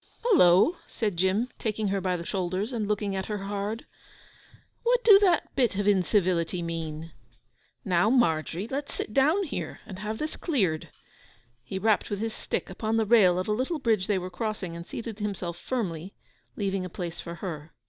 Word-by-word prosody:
'Hullo,' 325 Hz, -, +5 dB
said 210 Hz, -5 st, -2 dB
Jim, 190 Hz, +7 st, +1 dB
taking 215 Hz, -2 st, -1 dB
her 195 Hz, 0 st, 0 dB
by 180 Hz, -1 st, 0 dB
the 170 Hz, -, -7 dB
shoulders, 190 Hz, +5 st, -2 dB
and 220 Hz, -3 st, -1 dB
looking 205 Hz, -1 st, -1 dB
at 190 Hz, 0 st, -3 dB
her 210 Hz, -, -2 dB
hard. 205 Hz, +3 st, -3 dB, 1.0 s
'What 485 Hz, +1 st, +2 dB
dew 410 Hz, -3 st, +9 dB
that 365 Hz, -5 st, +2 dB
bit 245 Hz, -6 st, +2 dB
of 200 Hz, +1 st, -1 dB
incivility 180 Hz, -3 st, +2 dB
mean? 165 Hz, -1 st, -5 dB, 0.7 s
Now, 180 Hz, +2 st, +3 dB
Margery, 175 Hz, -5 st, +1 dB
let's 280 Hz, +3 st, -4 dB
sit 215 Hz, -, -4 dB
down 310 Hz, -, +4 dB
here, 315 Hz, -, -5 dB
and 190 Hz, -3 st, -8 dB
have 215 Hz, +2 st, -3 dB
this 305 Hz, +4 st, -4 dB
cleared.' 195 Hz, -, 0 dB, 0.7 s
He 160 Hz, +9 st, -5 dB
rapped 215 Hz, +2 st, +2 dB
with 205 Hz, -, -2 dB
his 225 Hz, +2 st, -3 dB
stick -, -, -3 dB
upon 220 Hz, 0 st, -2 dB
the 220 Hz, -, +2 dB
rail 200 Hz, -5 st, +5 dB
of 185 Hz, -, -2 dB
a -, -, 0 dB
little 260 Hz, +10 st, 0 dB
bridge 220 Hz, -8 st, +1 dB
they 205 Hz, -3 st, +2 dB
were 185 Hz, 0 st, -4 dB
crossing, 210 Hz, -5 st, -3 dB
and 170 Hz, 0 st, -8 dB
seated 225 Hz, -2 st, -6 dB
himself 195 Hz, -5 st, -3 dB
firmly, 190 Hz, -7 st, -3 dB, 0.4 s
leaving 195 Hz, -2 st, -1 dB
a 185 Hz, -, -5 dB
place 175 Hz, -1 st, -5 dB
for 170 Hz, 0 st, -6 dB
her. 165 Hz, -4 st, -6 dB
200 Hz, 180 wpm, -27 LUFS, 180-225 Hz, 1.0 s, dew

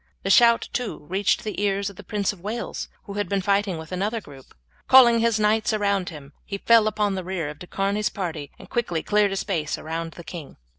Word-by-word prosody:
The 195 Hz, -, +1 dB
shout 235 Hz, +2 st, +6 dB
too 230 Hz, -11 st, -4 dB
reached 195 Hz, +1 st, +1 dB
the 210 Hz, -2 st, -4 dB
ears 200 Hz, -1 st, 0 dB
of -, -, -17 dB
the 205 Hz, -, -11 dB
Prince 205 Hz, 0 st, -1 dB
of 185 Hz, -, -16 dB
Wales, 220 Hz, +5 st, -4 dB
who 200 Hz, -, -8 dB
had 205 Hz, -3 st, -2 dB
been 200 Hz, -, +1 dB
fighting 200 Hz, -2 st, +1 dB
with 160 Hz, +1 st, -9 dB
another 205 Hz, +5 st, -1 dB
group. 140 Hz, -9 st, -15 dB, 0.3 s
Calling 240 Hz, -3 st, +7 dB
his 230 Hz, -1 st, +2 dB
knights 215 Hz, +1 st, +2 dB
around 200 Hz, -3 st, 0 dB
him 145 Hz, -4 st, -11 dB
he 200 Hz, -, -5 dB
fell 225 Hz, +1 st, +5 dB
upon 210 Hz, -1 st, 0 dB
the 190 Hz, -1 st, -3 dB
rear 175 Hz, -4 st, -3 dB
of 150 Hz, 0 st, -9 dB
De 180 Hz, -, -10 dB
Charny's 200 Hz, +3 st, 0 dB
party 160 Hz, -7 st, -5 dB
and -, -, -13 dB
quickly 175 Hz, -10 st, -1 dB
cleared 210 Hz, -1 st, +2 dB
a -, -, -2 dB
space 170 Hz, -6 st, -2 dB
around 165 Hz, +1 st, -5 dB
the 170 Hz, -, -10 dB
king. 165 Hz, -3 st, -9 dB
200 Hz, 225 wpm, -24 LUFS, 175-210 Hz, 0.3 s, Calling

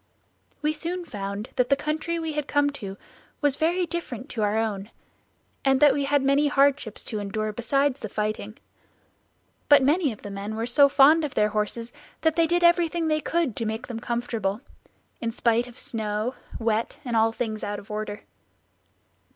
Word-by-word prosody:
"We 305 Hz, +1 st, +2 dB
soon 345 Hz, +3 st, -4 dB
found 200 Hz, -4 st, -5 dB
that 250 Hz, -1 st, +2 dB
the 275 Hz, -, +5 dB
country 305 Hz, +4 st, -2 dB
we 320 Hz, -1 st, -3 dB
had 295 Hz, -1 st, -2 dB
come 290 Hz, 0 st, +2 dB
to 200 Hz, -8 st, -7 dB, 0.4 s
was 290 Hz, -2 st, +3 dB
very 345 Hz, +4 st, +1 dB
different 265 Hz, -9 st, -5 dB
from 225 Hz, -, -2 dB
our 210 Hz, +1 st, +1 dB
own 210 Hz, -2 st, -2 dB, 0.7 s
and 270 Hz, -1 st, +3 dB
that 290 Hz, -1 st, +6 dB
we 280 Hz, 0 st, 0 dB
had 280 Hz, 0 st, +2 dB
many 280 Hz, +2 st, +3 dB
hardships 280 Hz, -5 st, +2 dB
to 215 Hz, -, -3 dB
endure 215 Hz, +1 st, -3 dB
besides 275 Hz, +4 st, +1 dB
the 220 Hz, -, -6 dB
fighting; 215 Hz, +1 st, -3 dB, 1.1 s
but 290 Hz, -2 st, +7 dB
many 295 Hz, +1 st, +3 dB
of 215 Hz, -, -11 dB
the 205 Hz, -, -6 dB
men 200 Hz, +2 st, -5 dB
were 225 Hz, +1 st, -2 dB
so 280 Hz, +4 st, +5 dB
fond 295 Hz, +4 st, +6 dB
of 295 Hz, -, -4 dB
their 210 Hz, 0 st, +3 dB
horses 220 Hz, +3 st, -2 dB, 0.3 s
that 320 Hz, -1 st, +2 dB
they 330 Hz, -1 st, +3 dB
did 345 Hz, +1 st, +1 dB
everything 340 Hz, -1 st, +3 dB
they 310 Hz, 0 st, +1 dB
could 325 Hz, -10 st, 0 dB
to 230 Hz, -, -2 dB
make 220 Hz, +2 st, -3 dB
them 235 Hz, -3 st, -6 dB
comfortable 230 Hz, -3 st, -2 dB, 0.6 s
in 230 Hz, -, -2 dB
spite 235 Hz, +1 st, +1 dB
of 245 Hz, -, -13 dB
snow, 215 Hz, +1 st, -2 dB, 0.2 s
wet, 225 Hz, 0 st, -1 dB
and 240 Hz, -2 st, -2 dB
all 225 Hz, 0 st, +4 dB
things 225 Hz, -2 st, -4 dB
out 205 Hz, 0 st, -3 dB
of 205 Hz, +1 st, -11 dB
order." 210 Hz, -1 st, -4 dB
245 Hz, 185 wpm, -25 LUFS, 215-295 Hz, 1.1 s, but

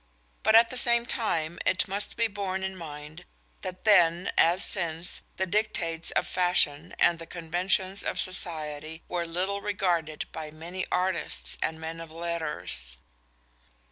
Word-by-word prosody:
But 220 Hz, +1 st, +4 dB
at 230 Hz, +1 st, +7 dB
the 255 Hz, -, -1 dB
same 235 Hz, -1 st, +3 dB
time 170 Hz, -10 st, -1 dB
it 185 Hz, -, +2 dB
must 200 Hz, +1 st, -2 dB
be 230 Hz, -, +3 dB
borne 195 Hz, -2 st, -3 dB
in 190 Hz, 0 st, -3 dB
mind 150 Hz, -2 st, -9 dB, 0.4 s
that 185 Hz, 0 st, -6 dB
then, 175 Hz, -4 st, +4 dB
as 175 Hz, +3 st, +4 dB
since, 170 Hz, -2 st, 0 dB, 0.2 s
the 190 Hz, -, +1 dB
dictates 175 Hz, -5 st, -1 dB
of -, -, +1 dB
fashion 175 Hz, -3 st, +2 dB
and 170 Hz, -1 st, +3 dB
the 165 Hz, -, -9 dB
conventions 185 Hz, +4 st, 0 dB
of -, -, -2 dB
society 160 Hz, -3 st, 0 dB
were 175 Hz, -1 st, -2 dB
little 190 Hz, +4 st, -2 dB
regarded 175 Hz, -7 st, -1 dB
by 155 Hz, -1 st, -6 dB
many 170 Hz, +4 st, -5 dB
artists 65 Hz, -, 0 dB
and 160 Hz, -, -1 dB
men 165 Hz, +1 st, -6 dB
of 165 Hz, -1 st, -10 dB
letters. 155 Hz, -, -1 dB
175 Hz, 145 wpm, -28 LUFS, 160-190 Hz, 0.4 s, at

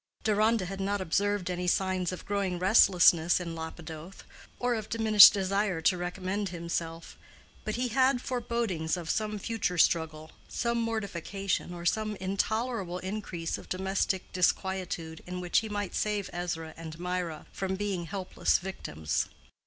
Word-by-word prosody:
Deronda 215 Hz, -1 st, +2 dB
had 195 Hz, +2 st, -5 dB
not 200 Hz, +1 st, 0 dB
observed 200 Hz, +1 st, 0 dB
any 180 Hz, 0 st, -2 dB
signs 185 Hz, -1 st, +1 dB
of 185 Hz, -, -7 dB
growing 200 Hz, -3 st, -1 dB
restlessness 180 Hz, -3 st, +5 dB
in 170 Hz, -2 st, -5 dB
Lapidoth, 160 Hz, +2 st, -8 dB, 0.3 s
or 245 Hz, 0 st, +1 dB
of 220 Hz, -2 st, -4 dB
diminished 220 Hz, -2 st, +9 dB
desire 195 Hz, -2 st, 0 dB
to 160 Hz, +3 st, +3 dB
recommend 185 Hz, +3 st, -3 dB
himself; 170 Hz, -1 st, -5 dB, 0.4 s
but 215 Hz, -, -2 dB
he 250 Hz, +1 st, -1 dB
had 260 Hz, +2 st, +3 dB
forebodings 230 Hz, -10 st, -1 dB
of 170 Hz, -2 st, -2 dB
some 215 Hz, -1 st, -1 dB
future 205 Hz, -4 st, -2 dB
struggle, 160 Hz, -2 st, +1 dB, 0.2 s
some 235 Hz, -1 st, -1 dB
mortification, 200 Hz, -4 st, -2 dB
or 175 Hz, -1 st, -7 dB
some 215 Hz, +3 st, 0 dB
intolerable 195 Hz, 0 st, -1 dB
increase 185 Hz, -3 st, -4 dB
of -, -, -14 dB
domestic 190 Hz, 0 st, -1 dB
disquietude 180 Hz, -3 st, -1 dB
in 180 Hz, 0 st, -4 dB
which 180 Hz, -1 st, +2 dB
he 220 Hz, -, -5 dB
might 205 Hz, -2 st, -3 dB
save 210 Hz, -2 st, -1 dB
Ezra 170 Hz, -2 st, -4 dB
and 165 Hz, -1 st, -8 dB
Mirah 180 Hz, -3 st, -3 dB
from 190 Hz, 0 st, -2 dB
being 195 Hz, -3 st, -2 dB
helpless 190 Hz, -1 st, 0 dB
victims. 80 Hz, -, -3 dB
190 Hz, 145 wpm, -29 LUFS, 175-210 Hz, 0.4 s, diminished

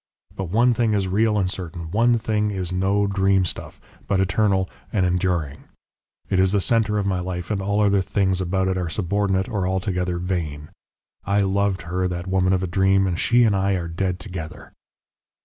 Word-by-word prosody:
But 95 Hz, -3 st, -4 dB
one 120 Hz, +6 st, +3 dB
thing 115 Hz, -2 st, +1 dB
is 95 Hz, -2 st, 0 dB
real 105 Hz, +3 st, +2 dB
and 95 Hz, -2 st, +1 dB
certain, 85 Hz, -3 st, -6 dB
one 115 Hz, +4 st, +3 dB
thing 105 Hz, -1 st, 0 dB
is 95 Hz, -3 st, -3 dB
no 95 Hz, +2 st, +1 dB
dreamstuff, 95 Hz, -2 st, 0 dB, 0.3 s
but 100 Hz, -, +1 dB
eternal 95 Hz, 0 st, +1 dB, 0.2 s
and 95 Hz, -4 st, +1 dB
enduring. 90 Hz, -5 st, -1 dB, 0.6 s
It 95 Hz, -, +1 dB
is 95 Hz, 0 st, +3 dB
the 100 Hz, -, +3 dB
centre 105 Hz, +1 st, +1 dB
of 100 Hz, -, 0 dB
my 95 Hz, -2 st, 0 dB
life, 90 Hz, +1 st, -4 dB
and 100 Hz, -2 st, -1 dB
all 100 Hz, +2 st, 0 dB
other 100 Hz, -1 st, +3 dB
things 95 Hz, -1 st, 0 dB
about 95 Hz, +1 st, 0 dB
it 95 Hz, -1 st, 0 dB
are 85 Hz, -2 st, -2 dB
subordinate 95 Hz, +1 st, 0 dB
or 100 Hz, -6 st, -2 dB
altogether 90 Hz, -2 st, -1 dB
vain. 80 Hz, -5 st, -3 dB, 0.5 s
I 100 Hz, +1 st, +1 dB
loved 100 Hz, 0 st, 0 dB
her, 90 Hz, +2 st, -1 dB
that 90 Hz, 0 st, -4 dB
woman 95 Hz, 0 st, +1 dB
of 95 Hz, 0 st, +1 dB
a -, -, -1 dB
dream. 95 Hz, +1 st, +2 dB
And 90 Hz, -2 st, -1 dB
she 120 Hz, +1 st, +4 dB
and 110 Hz, -3 st, +3 dB
I 95 Hz, 0 st, +1 dB
are 90 Hz, -3 st, -2 dB
dead 90 Hz, +2 st, -2 dB
together! 90 Hz, -6 st, -8 dB
95 Hz, 190 wpm, -22 LUFS, 90-100 Hz, 0.6 s, she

